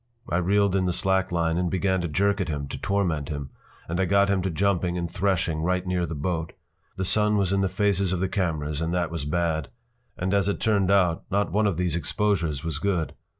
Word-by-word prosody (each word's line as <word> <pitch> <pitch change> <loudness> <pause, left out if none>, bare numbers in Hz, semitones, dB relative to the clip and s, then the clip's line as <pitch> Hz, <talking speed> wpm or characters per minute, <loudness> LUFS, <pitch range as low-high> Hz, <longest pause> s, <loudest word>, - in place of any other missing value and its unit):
I 85 - 0
reeled 100 +2 +2
in 95 -1 +1
the 90 - 0
slack 95 +1 +1
line 85 -1 +1
and 90 -1 0
began 95 0 +1
to 85 - -2
jerk 100 +5 +1
at 95 - -2
him 75 -2 -3
to - - -5
torment 90 -8 0
him, 70 -2 -5 0.4
and 85 +2 -2
I 95 - +3
got 100 +2 +3
him 95 -1 +1
to 95 - -1
jumping 90 0 0
and 85 -1 -2
threshing 85 -3 0
right 90 +2 0
near 90 -1 0
the 80 - -5
boat. 80 +2 -2 0.4
The 95 - -2
sun 105 +2 +3
was 100 -1 +1
in 100 - +2
the 95 - +1
faces 100 -1 +1
of 95 - -1
the 95 - +1
cameras 80 -6 -2
and 85 +2 -1
that 85 -2 0
was 80 -4 -4
bad. 80 -1 -1 0.5
And 95 +2 -1
as 100 -1 +2
it 100 - -1
turned 100 -4 +2
out 90 -4 +3
not 100 -2 0
one 105 +3 +2
of 95 -5 -1
these 90 -3 0
exposures 85 -5 0
was 80 -3 -3
good. 90 -3 -1
90 Hz, 235 wpm, -25 LUFS, 85-100 Hz, 0.5 s, I